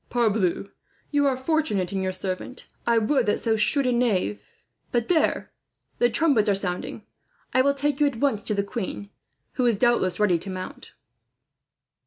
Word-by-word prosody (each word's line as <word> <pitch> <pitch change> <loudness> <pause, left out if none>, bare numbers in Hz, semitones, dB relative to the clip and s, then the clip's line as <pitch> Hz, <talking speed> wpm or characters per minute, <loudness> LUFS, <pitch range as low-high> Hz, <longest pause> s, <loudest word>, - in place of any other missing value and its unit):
"Parbleu! 215 -5 0 0.4
You 290 -1 +3
are 265 -2 +1
fortunate 260 - 0
in 195 - -1
your 190 0 -1
servant! 185 +6 -4 0.2
Would 235 +2 +2
that 210 - +2
so 225 -1 +1
shrewd 275 +6 +1
a 250 - +2
knave 195 - 0 0.5
"But 235 -2 0
there, 325 -4 +1 0.5
the 240 - +4
trumpets 235 -6 +3
are 200 - +3
sounding. 180 -2 -3 0.5
I 260 - +5
will 280 +1 +2
take 285 0 0
you 295 - +4
at 280 - -2
once 230 -3 0
to 210 - 0
the 200 - +1
queen, 200 0 -5 0.4
who 255 - -1
is 235 - +3
doubtless 200 -5 +2
ready 185 -5 +3
to 190 +4 -8
mount." 185 0 -7
225 Hz, 170 wpm, -25 LUFS, 195-260 Hz, 0.5 s, I